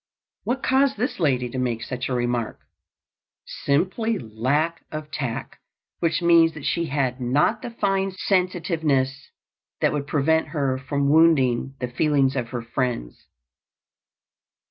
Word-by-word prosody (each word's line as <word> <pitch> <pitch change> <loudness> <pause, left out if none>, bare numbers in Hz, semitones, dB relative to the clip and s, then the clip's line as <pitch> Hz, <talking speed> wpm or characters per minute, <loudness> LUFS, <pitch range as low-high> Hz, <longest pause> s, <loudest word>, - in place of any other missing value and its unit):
What 255 +2 -1
caused 265 -1 +3
this 250 +2 -2
lady 130 -7 +1
to 130 - -4
make 120 -3 -1
such 125 +1 -4
a - - -1
remark? 120 -2 -2 0.8
Simply 190 +10 0
lack 130 - -1
of 155 -1 -6
tact, 125 -6 -4 0.4
which 165 0 0
means 165 -1 +5
that 150 - -8
she 170 -1 0
had 135 -3 -1
not 145 - +2
the - - -5
fine 195 -4 0
sensitiveness 165 -8 0 0.5
that - - +2
would 145 -1 -3
prevent 160 +2 +2
her 140 -4 -1
from 140 +1 -1
wounding 135 -5 +3
the 125 - -2
feelings 135 +1 +1
of 125 -3 -2
her 120 -2 -4
friends. 115 - -3
145 Hz, 135 wpm, -24 LUFS, 130-170 Hz, 0.8 s, means